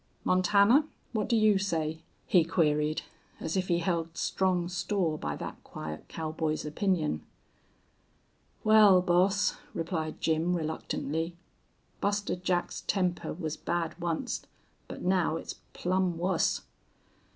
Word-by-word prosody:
"Montana, 200 - +4 0.3
what 215 -3 -1
do 235 - +3
you 215 -3 +4
say?" 160 -5 -1 0.2
he 180 -3 +5
queried, 155 -2 +1 0.4
as 160 - -3
if 185 -1 0
he 170 - +2
held 165 -1 -1
strong 180 -2 +1
store 175 -2 0
by 75 - -3
that - - -7
quiet 75 0 -7
cowboy's 155 -1 -2
opinion. 155 - 0 1.4
"Wal, 210 -4 +7
boss," 185 +3 +3 0.2
replied 160 -2 -3
Jim, 165 +2 +1
reluctantly, 160 +1 -3 0.6
"Buster 205 0 0
Jack's 180 -1 -1
temper 180 -3 0
was 160 -2 -4
bad 170 -1 -2
onct, 170 -2 -2 0.4
but - - -8
now 180 -3 +2
it's - - -6 0.2
plumb 185 -1 0
wuss." 175 0 +1
175 Hz, 120 wpm, -29 LUFS, 160-190 Hz, 1.4 s, Wal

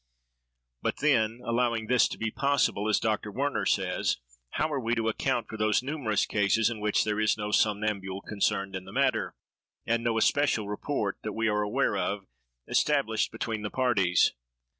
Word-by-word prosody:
But - - -1
then, 120 -5 +2
allowing 115 -1 0
this 125 +2 +4
to - - -7
be 115 -1 -2
possible, 140 -7 +1
as 105 - +3
Dr. 105 -1 -1
Werner 140 +6 -1
says, - - +1 0.4
how 155 0 0
are 140 - 0
we 120 -1 0
to 115 -1 0
account 115 +1 -1
for 110 - -7
those 110 +2 +2
numerous 130 -7 0
cases 105 +2 +2
in 115 - -5
which 105 0 +1
there 105 0 -1
is 110 0 +2
no 105 0 -3
somnambule 105 -3 0
concerned 100 -2 -1
in 95 0 -5
the - - -10
matter, - - 0 0.5
and 115 0 0
no 115 -1 +1
especial 115 -3 +2
rapport, 105 0 -2
that 110 - -4
we 115 +2 0
are 105 0 +1
aware 105 +1 0
of, 100 0 -2 0.4
established 135 -7 +1
between 115 -1 -3
the 105 - -3
parties? 100 -10 +2
110 Hz, 175 wpm, -28 LUFS, 105-120 Hz, 0.5 s, this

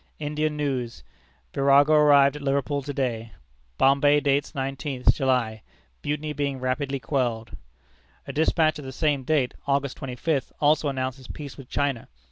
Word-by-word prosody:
Indian 150 0 -2
news. 130 -5 -3 0.5
Virago 140 +2 +4
arrived 145 -2 +5
at 150 - -7
Liverpool 140 +1 0
to 140 +1 -5
day; 115 -6 -3 0.4
Bombay 140 +2 +4
dates 145 +2 0
nineteenth 135 -1 0
July. 125 -6 0 0.4
Mutiny 150 +1 -2
being 140 -2 -2
rapidly 135 +2 -2
quelled." 120 -5 -2 0.7
A - - -7
despatch 155 0 +2
of 145 - -9
the 130 - -6
same 145 -1 0
date, 140 -3 +1
August 140 -1 0
twenty 130 -2 -6
fifth, 145 0 -1
also 150 0 +3
announces 130 -1 -4
peace 145 -3 -8
with 135 -3 -12
China. 140 -5 -1
140 Hz, 145 wpm, -25 LUFS, 130-145 Hz, 0.7 s, arrived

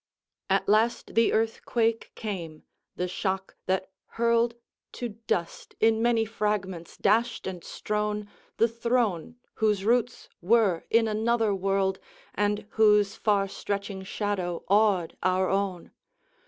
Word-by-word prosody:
XXIII. - - +4
At - - -8
last 225 +3 +2
the 230 0 +4
earthquake 225 0 0
came 170 -8 -6 0.3
the 180 - -2
shock, 190 +1 -3
that 190 0 -1 0.3
hurled 235 0 +2 0.4
To 245 - -4
dust, 210 -6 -4
in 225 0 +3
many 230 -1 +3
fragments 195 -5 -3
dashed 225 +3 +1
and 180 -3 -5
strown, 210 0 -2 0.3
The 230 - +4
throne, 235 -4 -1 0.3
whose 210 -3 +2
roots 240 +1 +1
were 195 -3 +3
in 225 0 +4
another 220 0 +1
world, 195 0 0 0.3
And 205 0 0
whose 210 -2 +4
far 205 -2 +1
stretching 200 0 -4
shadow 190 -3 -3
awed 200 -4 +3
our 185 0 +2
own. 195 -3 -2
210 Hz, 125 wpm, -27 LUFS, 190-225 Hz, 0.4 s, XXIII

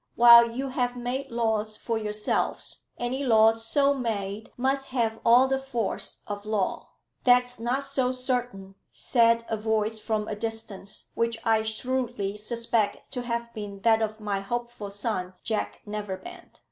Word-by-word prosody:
While 235 0 +9
you 265 +4 -4
have 250 -1 -1
made 255 +3 -3
laws 220 -2 -1
for 230 - -2
yourselves, 210 -1 -2
any 255 +3 -2
laws 225 -2 +4
so 280 +3 +3
made 215 -5 -3
must 270 +2 0
have 230 -3 0
all 245 +3 +6
the 265 0 0
force 255 -5 -3
of 205 -1 -5
law." 210 -3 -2 0.3
"That's 245 -1 +3
not 245 +4 0
so 260 -2 0
certain," 245 -6 -2 0.2
said 230 -1 +3
a 220 - -1
voice 220 0 0
from 215 -1 -2
a 215 - -3
distance, 220 -2 -4
which 230 0 0
I 225 -1 +4
shrewdly 220 -2 -2
suspect 230 0 -1
to 250 -2 -3
have 235 -1 -3
been 205 -2 -7
that 225 0 +4
of 215 0 -2
my 205 -2 -2
hopeful 240 0 -4
son, 200 -3 -3
Jack 220 -2 -2
Neverbend. 210 - -7
230 Hz, 150 wpm, -27 LUFS, 215-245 Hz, 0.3 s, While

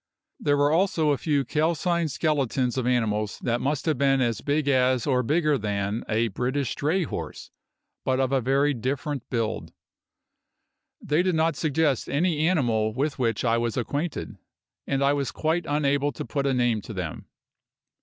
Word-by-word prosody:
There 145 0 +2
were 145 +1 +3
also 165 -3 +2
a 140 - +1
few 145 -4 +1
calcined 165 +4 0
skeletons 135 -5 0
of 130 -2 -1
animals 110 -4 0
that 120 -1 0
must 145 +1 -1
have 155 -6 0
been 135 -1 +3
as 120 -3 0
big 145 0 0
as 130 -3 +3
or 130 -3 +2
bigger 150 +2 +1
than 105 +1 -2
a 115 +1 +1
British 125 +6 -1
dray 165 +6 0
horse, - - -6 0.5
but 130 0 +1
of 130 -1 +1
very 140 +3 +2
different 135 +2 -3
build. 110 -9 -2 1.3
They 150 +3 +2
did 180 -1 +1
not 160 0 +2
suggest 145 -1 0
any 155 +1 +1
animal 115 -10 +1
with 140 +2 -1
which 115 -2 0
I 115 0 +2
was 115 0 -2
acquainted, 145 +6 -3 0.5
and 140 0 0
I 140 +1 +4
was 140 -4 -1
quite 160 - -1
unable 145 -1 +1
to - - -6
put 140 +4 -1
a 135 - +2
name 120 -3 +1
to 110 - -8
them. 90 -5 -5
135 Hz, 165 wpm, -25 LUFS, 120-150 Hz, 1.3 s, I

